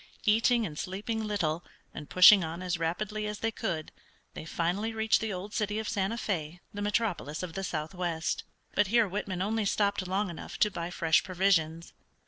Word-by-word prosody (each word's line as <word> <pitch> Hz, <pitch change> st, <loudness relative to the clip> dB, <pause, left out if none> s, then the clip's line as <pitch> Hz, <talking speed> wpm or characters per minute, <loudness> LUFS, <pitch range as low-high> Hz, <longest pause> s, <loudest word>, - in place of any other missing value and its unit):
Eating 230 Hz, +2 st, +4 dB
and 150 Hz, -5 st, -6 dB
sleeping 210 Hz, +4 st, -3 dB
little, 175 Hz, -6 st, -1 dB, 0.3 s
and 150 Hz, -, -8 dB
pushing 185 Hz, +1 st, +8 dB
on 165 Hz, +3 st, -5 dB
as 180 Hz, -2 st, -1 dB
rapidly 210 Hz, +6 st, -2 dB
as 210 Hz, 0 st, -4 dB
they 225 Hz, +1 st, -1 dB
could 165 Hz, -7 st, -3 dB, 0.4 s
they 155 Hz, -, -7 dB
finally 180 Hz, +8 st, -1 dB
reached 220 Hz, 0 st, +2 dB
the 220 Hz, -1 st, -2 dB
old 195 Hz, +2 st, -6 dB
city 210 Hz, -1 st, -1 dB
of 220 Hz, -1 st, -3 dB
Santa 195 Hz, +3 st, 0 dB
Fé, 175 Hz, -7 st, -3 dB
the 205 Hz, -, -5 dB
metropolis 205 Hz, -7 st, -1 dB
of 175 Hz, -3 st, -5 dB
the 195 Hz, -, -4 dB
southwest. 170 Hz, 0 st, -2 dB, 0.3 s
But 205 Hz, 0 st, +3 dB
here 230 Hz, +1 st, +4 dB
Whitman 190 Hz, -1 st, -3 dB
only 215 Hz, +1 st, 0 dB
stopped 200 Hz, -2 st, +1 dB
long 190 Hz, +1 st, 0 dB
enough 165 Hz, -, -8 dB
to 210 Hz, -, +4 dB
buy 170 Hz, -2 st, -4 dB
fresh 165 Hz, -2 st, +2 dB
provisions. 170 Hz, -3 st, +1 dB
190 Hz, 180 wpm, -30 LUFS, 170-210 Hz, 0.4 s, pushing